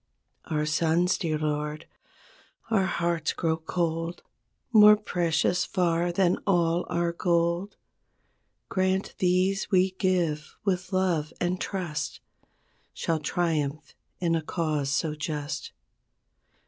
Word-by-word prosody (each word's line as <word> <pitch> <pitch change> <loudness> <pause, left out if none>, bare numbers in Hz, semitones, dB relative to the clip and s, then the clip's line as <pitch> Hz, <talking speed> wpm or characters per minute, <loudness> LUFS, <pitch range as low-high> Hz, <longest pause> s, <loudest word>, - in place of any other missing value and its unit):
Our 150 -1 -1
sons, 165 +4 +2
dear 160 -4 -1
Lord, 150 0 -2 0.9
our 195 -4 +3
hearts 170 -3 0
grow 165 -2 0
cold 165 +1 -2 0.5
More 210 -1 +9
precious 180 -3 +1
far 175 -2 +1
than 180 0 +2
all 175 -2 +2
our 170 0 0
gold. 170 +2 0 0.9
Grant 190 0 0
these 185 +2 +1
we 190 -1 +3
give 180 -5 -1
with 185 -1 -1
love 175 -5 +1
and 180 +1 -1
trust 175 -6 -3 0.8
Shall 165 -1 -1
triumph 155 -2 -1 0.3
in 170 -2 +1
a 165 - +1
cause 155 -3 -1
so 150 +2 0
just. 150 -2 -4
170 Hz, 110 wpm, -27 LUFS, 155-185 Hz, 0.9 s, More